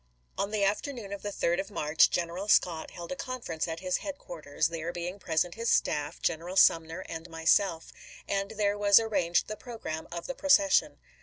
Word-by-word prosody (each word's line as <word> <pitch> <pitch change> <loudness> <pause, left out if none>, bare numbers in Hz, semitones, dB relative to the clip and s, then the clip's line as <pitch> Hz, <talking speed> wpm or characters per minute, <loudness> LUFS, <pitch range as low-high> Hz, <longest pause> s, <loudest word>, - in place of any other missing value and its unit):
On 200 - -1
the 210 -1 0
afternoon 210 +1 -2
of 200 - -6
the 205 - -4
3d 175 -3 0
of 195 - -4
March, 150 -6 +3
General 175 +3 -2
Scott 170 -5 +2
held 170 -1 -9
a - - -2
conference 235 -13 -4
at 165 +1 -5
his 185 -1 0
headquarters, 165 - -3
there 165 0 -4
being 175 +3 -5
present 170 0 0
his 230 +1 -2
staff, 145 -1 0
General 170 +2 -1
Sumner, 165 +1 +4
and 165 +1 -7
myself; 165 +1 +1 0.3
and 195 0 -1
then 205 -2 -1
was 205 0 +7
ar 225 - -2
ranged 180 -5 +1
the 215 - -5
programme 215 -9 -7
of 170 0 -5
the 270 - -4
procession. 290 +1 +3
180 Hz, 185 wpm, -29 LUFS, 165-205 Hz, 0.3 s, was